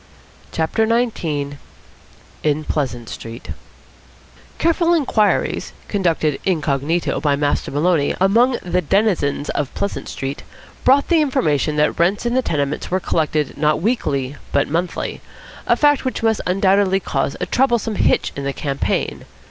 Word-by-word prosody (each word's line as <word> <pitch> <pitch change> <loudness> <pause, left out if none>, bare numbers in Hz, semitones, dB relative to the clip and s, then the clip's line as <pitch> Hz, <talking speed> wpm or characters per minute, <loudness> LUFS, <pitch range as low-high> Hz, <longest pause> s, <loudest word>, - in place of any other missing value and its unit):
CHAPTER 165 +8 0
XIX 165 -12 -1 0.8
IN 150 0 0
PLEASANT 125 -6 -2
STREET 115 +2 -8 1.1
Careful 335 +1 +2
inquiries, 235 -9 +1
conducted 165 -7 0
incognito 160 -1 0
by 145 -2 +2
Master 145 0 0
Maloney 150 +1 +1
among 235 +7 +4
the 180 0 0
denizens 175 -6 +1
of 145 -2 -2
Pleasant 200 - -3
Street, 135 +1 -4 0.4
brought 275 +2 +4
the 335 -3 +4
information 160 - +1
that 150 0 +1
rents 190 +7 +2
in 240 - 0
the 260 - +3
tenements 145 - -2
were 185 - +1
collected 155 -5 -1
not 150 0 +2
weekly 145 - -1
but 140 - +2
monthly, 170 +4 -2 0.5
a - - +4
fact 290 -1 +3
which 255 -3 -3
must 220 -1 +2
undoubtedly 195 +1 +3
cause 140 -6 -2
a - - -1
troublesome 240 -4 +1
hitch - - +2
in 140 - -5
the 140 0 -2
campaign. 140 -1 -2
170 Hz, 135 wpm, -20 LUFS, 145-220 Hz, 1.1 s, among